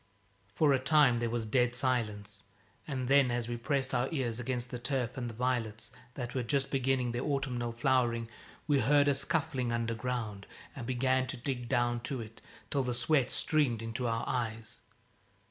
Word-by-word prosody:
For 145 +8 +3
a 135 - +3
time 135 -3 +4
there 120 -1 0
was 115 -1 -2
dead 125 +2 +2
silence, 115 -6 -1 0.5
and 130 -4 -2
then 135 -1 +5
as 120 -1 -1
we 120 - -2
pressed 135 +2 -1
our 125 +2 +1
ears 125 -7 -1
against 125 0 -2
the 125 - -4
turf 125 -1 -1
and 120 -2 -3
the - - -7
violets, 115 -3 -1 0.2
that 125 -2 -4
were 130 - 0
just 135 +3 0
beginning 130 -2 +1
their 120 +1 -2
autumnal 130 -4 -1
flowering, 120 -1 +1 0.4
we 145 -2 +3
heard 145 +4 +4
a 140 - +5
scuffling 135 -2 0
underground 115 -3 -2 0.3
and 120 -3 -6
began 130 +1 +1
to - - -4
dig 125 -1 -3
down 120 -2 +2
to 125 +2 -4
it, 110 -1 -9 0.3
till 140 - +2
the 125 -2 -1
sweat 130 +1 +2
streamed 135 -8 +1
into 115 +2 -2
our 115 0 -1
eyes. 115 -2 -2
125 Hz, 180 wpm, -32 LUFS, 115-135 Hz, 0.5 s, then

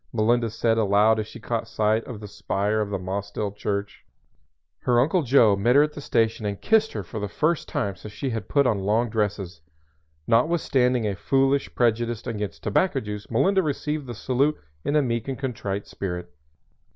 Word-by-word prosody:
Melinda 115 +1 +2
said 115 +1 +1
aloud 105 +1 +4
as 105 - -3
she 115 - -11
caught 115 0 -3
sight 110 0 +1
of 120 -5 -7
the 105 - -7
spire 105 +1 -1
of 105 - -2
the 100 - -1
Mossdale 100 +2 -4
Church. 100 -1 -3 0.8
Her 120 -2 +2
Uncle 165 +8 +3
Joe 120 -6 +5
met 120 +6 +2
her 145 - +7
at 150 0 -2
the 145 - -8
station 115 -4 +1
and 100 -1 -3
kissed 220 0 +2
her - - -4
for 110 - -6
the 105 - -2
first 155 - 0
time 100 -2 -2
since 105 +4 -10
she 135 +4 -3
had 115 -2 -4
put 140 -1 +3
on 110 -5 +2
long 110 +4 +1
dresses. 100 -6 -2 0.6
Notwithstanding 125 -2 +2
a 100 -2 -1
foolish 135 +5 +1
prejudice 120 -1 +1
against 105 -4 -4
tobacco 135 - +1
juice 105 -3 -7
Melinda 190 - +3
received 150 -2 -2
the 120 - -6
salute 135 +6 +1 0.3
in 145 - 0
a 150 - +4
meek 115 -2 -2
and 135 -2 -3
contrite 105 -7 -3
spirit. 90 -2 -5
115 Hz, 190 wpm, -25 LUFS, 105-135 Hz, 0.8 s, her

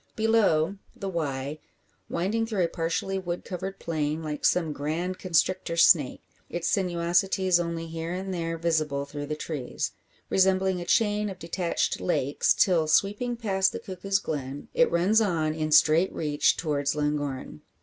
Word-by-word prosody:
Below, 205 -6 +2 0.2
the 195 - -5
Wye, 145 -4 -3 0.5
winding 210 +7 -1
through 210 -5 0
a - - +2
partially 165 +4 -2
wood 175 -2 -4
covered 190 +2 -5
plain, 155 -1 -2
like 150 -1 -4
some 165 -4 +2
grand 165 +6 -3
constrictor 180 -1 0
snake; 155 -5 +4 0.3
its 175 -1 -3
sinuosities 180 0 +2
only 170 -1 -3
here 165 +1 -5
and 190 +1 -4
there 165 -1 -2
visible 155 -4 0
through 145 0 -6
the 150 - -2
trees, 150 -4 -4 0.4
resembling 190 -1 +2
a - - -5
chain 210 +1 +2
of 190 - -7
detached 170 0 -1
lakes 130 +9 +1
till 170 -5 +3
sweeping 205 +9 +1
past 195 -4 +1
the - - -4
Cuckoo's 195 +1 -2
Glen, 145 -6 -5
it 245 - +4
runs 185 +6 +3
on 165 -7 0
in 155 -1 -2
straight 155 +4 +5
reach 150 -2 +1
towards 145 -3 -1
Llangorren. 145 - -3
170 Hz, 150 wpm, -27 LUFS, 155-190 Hz, 0.5 s, straight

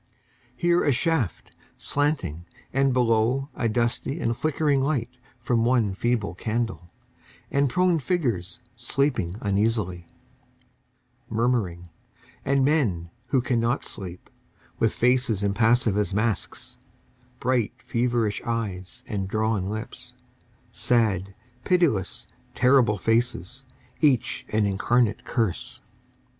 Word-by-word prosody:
Here 175 0 +2
a 145 - +3
shaft, 130 - 0 0.3
slanting, 115 - -1 0.3
and 135 0 +3
below 125 +2 +2
A 115 - -1
dusty 120 +6 -1
and 115 -6 0
flickering 150 -1 +1
light 130 -4 -1 0.2
from 120 -1 +1
one 115 -5 +2
feeble 110 -3 -1
candle 110 -2 -3 0.6
And 140 0 +2
prone 180 +3 +2
figures 120 - -2
sleeping 120 -6 0
uneasily, 100 -4 0 1.2
Murmuring, 110 -7 0 0.5
And 135 -1 +2
men 105 - +1 0.2
who 130 - +2
cannot 120 0 0
sleep, 90 -4 -7 0.5
With 115 - +3
faces 125 -4 +2
impassive 110 +2 +3
as 100 -2 0
masks, 110 0 -2 0.6
Bright, 125 -4 +1
feverish 120 -3 0
eyes, 100 -6 -4
and 100 -4 -2
drawn 110 -2 0
lips, 110 +1 -6 0.6
Sad, 100 -5 +1 0.3
pitiless, 120 - +1 0.3
terrible 125 -4 +4
faces, 115 +2 -1 0.3
Each 140 -7 +1
an 110 -1 +2
incarnate 110 +3 +1
curse. 110 -7 -2
115 Hz, 100 wpm, -25 LUFS, 100-130 Hz, 1.2 s, terrible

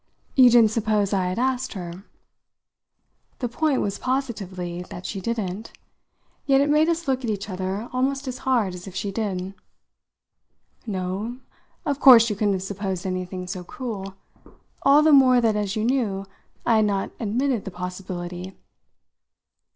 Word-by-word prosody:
"You 255 -2 +8
didn't 230 -3 +6
suppose 215 -3 +1
I 190 -2 +1
had 185 - -3
asked 260 +1 0
her?" 180 0 -7 1.3
The 245 - -2
point 280 +3 0
was 200 0 -2
positively 195 -10 -3
that 175 - -8
she 195 - -4
didn't; 215 -1 -3 0.7
yet 270 -1 +5
it 285 +1 +2
made 305 +2 +4
us 335 -1 -1
look 260 -1 0
at 235 - -2
each 200 -2 -3
other 190 +4 -3
almost 270 +2 -1
as 255 0 -4
hard 235 -8 +1
as 180 +1 -9
if 190 - -9
she 200 +1 -2
did. 195 -3 -3 1.3
"No, 195 +4 -3 0.5
of 285 -1 -1
course 235 -5 +8
you - - -1
couldn't 205 -1 +1
have 185 - -4
supposed 195 -1 -4
anything 185 0 -3
so 180 0 -5
cruel 195 -2 -6 0.7
all 285 +2 +6
the 310 -1 +5
more 260 -3 +7
that, 225 -3 +2
as 205 -2 -1
you 215 - -1
knew, 225 -7 0 0.4
I 230 -2 +4
had 215 - +4
not 200 -2 -1
admitted 240 +2 0
the - - -4
possibility." 180 0 -6
210 Hz, 160 wpm, -24 LUFS, 190-255 Hz, 1.3 s, You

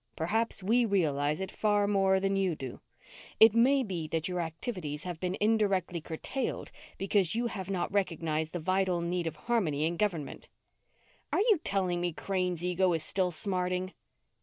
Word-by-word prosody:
Perhaps 210 +4 -1
we 235 +5 +3
realize 150 -8 +1
it 190 - -4
far 205 -1 +2
more 195 -1 +3
than 195 0 0
you 190 -4 +1
do. 130 -4 -7 0.6
It 220 -1 +8
may 260 +4 +4
be 175 -8 -4
that 160 0 -1
your 180 -1 -2
activities 160 - -4
have 175 -3 -5
been 180 +1 -2
indirectly 200 -5 +1
curtailed 165 - -4 0.3
because 195 -1 +1
you 240 +1 0
have 195 -5 -4
not 190 0 -2
recognized 160 -5 -1
the 175 - -2
vital 185 +1 +1
need 175 0 -1
of 160 - -4
harmony 170 -11 0
in 170 +1 -1
government." 175 -8 -2 0.8
"Are - - +1
you 430 -5 +4
telling 185 -3 0
me 175 -1 -1
Crane's 180 -1 -2
ego 180 +1 +2
is 160 -2 0
still 185 +1 +1
smarting?" 180 +1 -1
185 Hz, 165 wpm, -30 LUFS, 165-200 Hz, 0.8 s, It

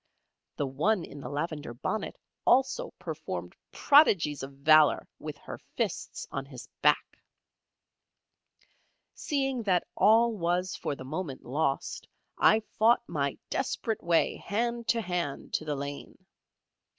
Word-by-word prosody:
The 145 - -1
one 165 +8 0
in 145 - -11
the - - -7
lavender 150 -4 -4
bonnet 215 - -3 0.3
also 270 - +3
performed - - -6 0.2
prodigies 195 - +4
of 135 +1 -6
valour 150 +2 +5
with - - -7
her - - -9 0.2
fists - - -3
on 135 - -3
his 125 -5 -10
back. 150 0 +2 1.9
Seeing 270 -4 -1
that 185 -5 +1
all 225 +4 +5
was 180 0 0
for 145 - -3
the 130 - -9
moment 150 -1 -5
lost, 140 +1 -2 0.3
I 220 - +5 0.2
fought 235 +2 +4
my 140 -4 -2
desperate 225 -4 -2
way 170 -1 +2
hand 235 +2 -2
to 230 - +2
hand 175 -7 -3
to 155 - -1
the 150 -1 -1
lane. 140 +1 -6
170 Hz, 125 wpm, -29 LUFS, 145-225 Hz, 1.9 s, valour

